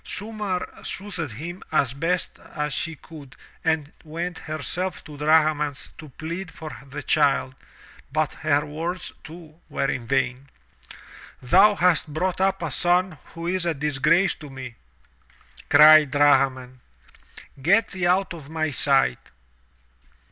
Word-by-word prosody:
Sumarr 205 -3 -3
soothed 180 - -5
him 170 +10 -7
as 140 -5 +1
best 170 +6 -2 0.3
she 165 +3 -3
could 145 -4 -13 0.3
and 160 -3 0
went 170 +3 -5
herself 165 +4 -4
to 150 - -11
Drahman 150 -1 +2 0.2
to 155 - -10
plead 165 +6 -6
for 155 0 -9
the 145 +1 -6
child, 140 -3 +2 0.6
but 155 +1 0
her 145 -1 0
words, 165 +5 -5
too, 160 -1 -12
were 135 0 -1
in 115 - -5
vain. 130 +1 -1 0.9
"Thou 195 +11 +5
hast 175 -4 +2
brought 180 +4 -1
up 190 -2 +1
a 160 - -3
son 175 +2 +1 0.2
who 165 0 -6
is 185 +1 0
a 165 - 0
disgrace 150 +6 +2
to 150 - -12
me," 130 -3 -8 1.0
cried 150 0 +8
Drahman. 130 -3 +2 0.8
"Get 200 +9 +3
thee 185 -2 -1
out 185 +1 +1
of 155 -4 -10
my 155 -1 -1
sight!" 135 - +2
155 Hz, 130 wpm, -24 LUFS, 145-175 Hz, 1.0 s, cried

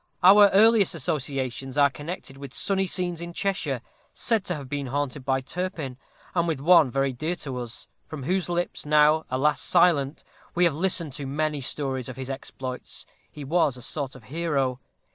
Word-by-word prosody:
Our 200 +2 +8
earliest 210 -1 +5
associations 135 -2 -3
are 140 -1 +5
connected 145 -1 -7
with 140 0 -10
sunny 195 -1 +1
scenes 175 -2 0
in 170 0 -6
Cheshire, 170 - -1 0.3
said 225 -4 +1
to 180 - -1
have 140 -3 -7
been 140 0 -3
haunted 140 +1 -2
by 135 0 0
Turpin; 160 -3 -4 0.4
and 170 -1 +1
with 160 -5 -1
one 160 -1 +6
very 135 +1 0
dear 155 +8 -2
to 135 -6 -5
us 120 -1 -7 0.2
from 150 -4 -7
whose 180 +5 0
lips, 175 0 -2
now, 150 +1 +4
alas! 145 +4 +1
silent, 145 -5 +3 0.3
we 175 - +3
have 170 -3 +4
listened 170 -2 +1
to 140 -1 -5
many 150 +1 -1
stories 130 -1 -1
of 130 - -8
his 130 0 -5
exploits 130 -1 -6 0.3
he 150 - -9
was 150 -2 +1
a 125 - -10
sort 140 -4 -3
of 130 - -13
hero. 135 -2 -1
150 Hz, 180 wpm, -25 LUFS, 135-175 Hz, 0.4 s, Our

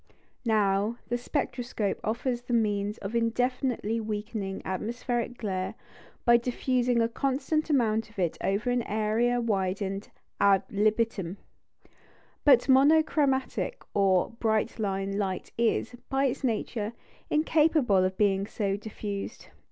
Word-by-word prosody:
Now 210 +1 +2
the 240 - +1
spectroscope 245 -5 -2
offers 240 +2 -1
the 245 0 -1
means 210 -1 0
of 200 +3 -6
indefinitely 235 -1 0
weakening 210 -2 -4
atmospheric 235 +5 -2
glare 185 -3 -3 0.5
by 235 -1 +7
diffusing 245 0 +1
a - - +2
constant 275 +6 -1
amount 225 -6 +2
of 215 - -22
it 175 -4 0
over 205 +5 0
an 245 0 +1
area 220 +3 +1
widened 195 -2 -1 0.3
ad 195 -1 +5
libitum. 210 -3 0 1.1
But 265 -4 +6
monochromatic 285 - +3
or 190 -2 +3
"bright 220 +1 0
line" 195 -1 -1
light 190 -2 -3
is, 235 +1 +1 0.2
by 270 0 +2
its 270 +1 -1
nature, 225 -2 -1 0.4
incapable 305 - +3
of 185 0 -1
being 200 -1 +2
so 200 -3 -1
diffused. 205 -1 -6
225 Hz, 120 wpm, -28 LUFS, 200-245 Hz, 1.1 s, by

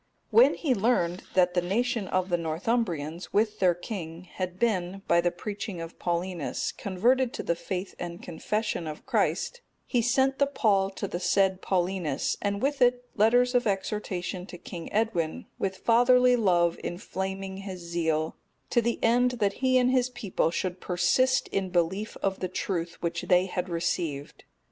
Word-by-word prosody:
When 475 +2 +6
he 290 -6 +1
learned 195 -6 +1
that 180 -1 +4
the 175 - +2
nation 225 +3 0
of 185 0 0
the 175 - +2
Northumbrians, 170 -1 -2
with 215 0 +1
their 180 -2 +4
king, 175 -3 -6
had 180 0 -5
been, 195 -3 0
by 170 0 +4
the 175 - +2
preaching 200 +1 -6
of 165 +1 -8
Paulinus, 175 -2 -2
converted 240 +7 +1
to - - -4
the 170 - 0
faith 185 +2 -4
and 175 0 -5
confession 195 +1 -3
of 155 -1 -7
Christ, - - 0 0.2
he 245 - +1
sent 265 +3 +2
the 280 - +4
pall 200 -8 +2
to 195 +1 -5
the 175 - -4
said 190 +1 +2
Paulinus, 180 -5 0
and 200 +1 -1
with 280 0 0
it 245 0 +3
letters 245 +4 +4
of 245 -2 +2
exhortation 190 -2 -3
to 175 - -9
King 170 -1 -8
Edwin, 200 -7 -1
with 190 -1 -2
fatherly 250 +3 +5
love 175 -6 +2
inflaming 190 +1 -4
his 190 -2 -7
zeal, 160 -2 -1 0.4
to 240 - +4
the 235 0 0
end 245 +2 +3
that 205 -5 0
he 260 -1 +4
and 250 0 +3
his 255 -1 +2
people 215 -9 -1
should 180 +1 -3
persist 255 +9 +2
in 195 -1 -1
belief 180 +4 -1
of 195 -1 0
the 185 - -2
truth 170 -2 -3
which 170 0 -1
they 180 0 +4
had 180 -1 -3
received. 165 -4 -3
190 Hz, 170 wpm, -27 LUFS, 175-230 Hz, 0.4 s, When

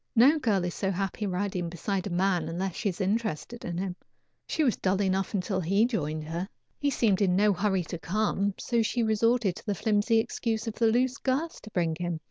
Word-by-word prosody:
No 275 +7 +6
girl 205 -9 +1
is 175 - -2
so 195 - -1
happy 195 +2 -2
riding 180 -2 -2
beside 185 +3 -2
a - - -4
man 175 -2 +1
unless 180 +2 -2
she 205 - -1
is 180 - -6
interested 215 +2 -2
in 175 -1 -4
him. 185 -1 -3 0.5
She 315 - 0
was 250 -6 +3
dull 190 +1 0
enough 195 0 0
until 190 0 -1
he 195 +6 +3
joined 155 -10 -2
her. 170 +5 -4 0.3
He 285 - +1
seemed 215 -7 +2
in 185 -3 +3
no 205 +1 +4
hurry 190 0 +1
to 170 +1 -6
come, 200 +1 0
so 235 -2 0
she 235 +2 0
resorted 220 -2 +2
to - - -12
the 205 - 0
flimsy 215 +3 +2
excuse 225 -1 -1
of 225 - -3
the 230 +1 +2
loose 250 +3 +2
girth 280 +5 -1
to 215 - -11
bring 170 -5 0
him. 175 -2 -2
200 Hz, 215 wpm, -28 LUFS, 180-225 Hz, 0.5 s, No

